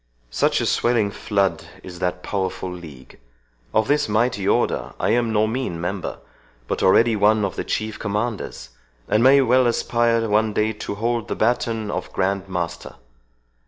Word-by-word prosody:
Such - - +1
a - - 0
swelling 115 -4 +1
flood 100 -5 -1 0.2
is 90 -1 -9
that 90 0 -2
powerful 95 -2 -3
league. 80 -8 -11 0.5
Of 110 0 +2
this 145 -4 +1
mighty 105 -2 +1
Order - - 0
I - - +1
am 120 -1 +1
no 110 0 +3
mean 110 -7 -3
member, 90 +2 -4 0.5
but - - -2
already 115 +4 +4
one 105 0 +3
of 100 - -4
the - - -3
Chief 110 0 -3
Commanders, 105 +1 -3 0.4
and 105 +2 +2
may 135 +3 +6
well 130 0 +4
aspire 115 -1 +1
one 105 +1 +2
day 110 +1 +1
to 105 -1 -6
hold 115 +2 -1
the - - -3
batoon 115 -2 0
of - - -4
Grand 95 0 -1
Master. 90 -3 -4
105 Hz, 160 wpm, -22 LUFS, 95-115 Hz, 0.5 s, may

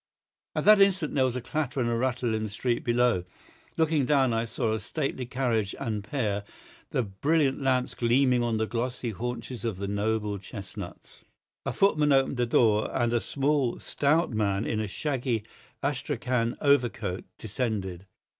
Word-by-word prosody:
At - - -1
that 210 -1 +8
instant 185 -6 +3
there 135 -2 +3
was 125 -1 -1
a 125 - -2
clatter 140 +1 -2
and 120 - +1
a 120 - 0
rattle 120 -1 0
in 110 - -1
the 110 - -3
street 120 +4 -1
below. 120 -5 +2 0.5
Looking 160 -3 +2
down 135 -3 +3
I 115 +1 0
saw 115 -1 -1
a 110 - -1
stately 130 +2 -3
carriage 120 -6 0
and 105 -3 -2
pair, 105 -3 -1 0.5
the 125 - 0
brilliant 140 +8 +1
lamps 130 -2 +1
gleaming 125 +1 +3
on 115 -2 0
the 110 - +1
glossy 120 +1 -3
haunches 120 +3 -5
of 115 -5 -2
the 100 +1 -3
noble 105 0 -1
chestnuts. 100 -1 -9 0.4
A - - +1
footman 155 -7 +3
opened 135 -1 +3
the 120 -1 +1
door, 110 -2 +3
and 120 -2 +1
a 120 - +3
small, 140 -1 0
stout 155 +3 +1
man 105 -2 0
in 110 - -1
a 110 - -1
shaggy 125 -1 -2 0.4
astrachan 125 -3 -1
overcoat 120 -9 +1
descended. 100 -5 -3
120 Hz, 165 wpm, -28 LUFS, 110-135 Hz, 0.5 s, that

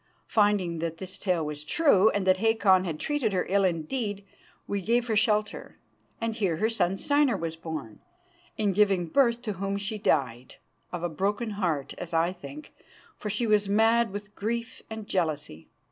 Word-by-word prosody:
Finding 205 -6 +2
that 165 0 -3
this 190 +1 -7
tale 180 -5 0
was 150 0 -5
true, 215 - +4
and 200 -3 -1
that 185 0 +4
Hakon 205 -3 +3
had 160 -4 -4
treated 285 -8 -1
her 185 - 0
ill 195 +2 +2
indeed, 195 +4 -2 0.4
we 200 -1 -2
gave 235 +5 +1
her 225 -2 -1
shelter, 210 0 0 0.4
and 230 0 -1
here 195 -8 0
her 220 +5 +1
son 195 -4 0
Steinar 285 -2 +2
was 165 -2 -4
born, 160 -9 -7 0.6
in 205 -2 +1
giving 195 -3 +3
birth 240 - +2
to 215 -3 -2
whom 195 0 -1
she 205 +2 -4
died 130 - 0 0.4
of 175 -1 -5
a - - +1
broken 205 +7 -1
heart, 170 -9 -2
as 170 -1 -5
I 170 +2 +2
think, 285 +12 -11 0.5
for 210 - -4
she 215 +4 0
was 210 -2 +2
mad 225 +2 +4
with 205 +1 -7
grief 230 +3 -4
and 220 -2 -7
jealousy. 150 - -2
200 Hz, 175 wpm, -27 LUFS, 170-220 Hz, 0.6 s, true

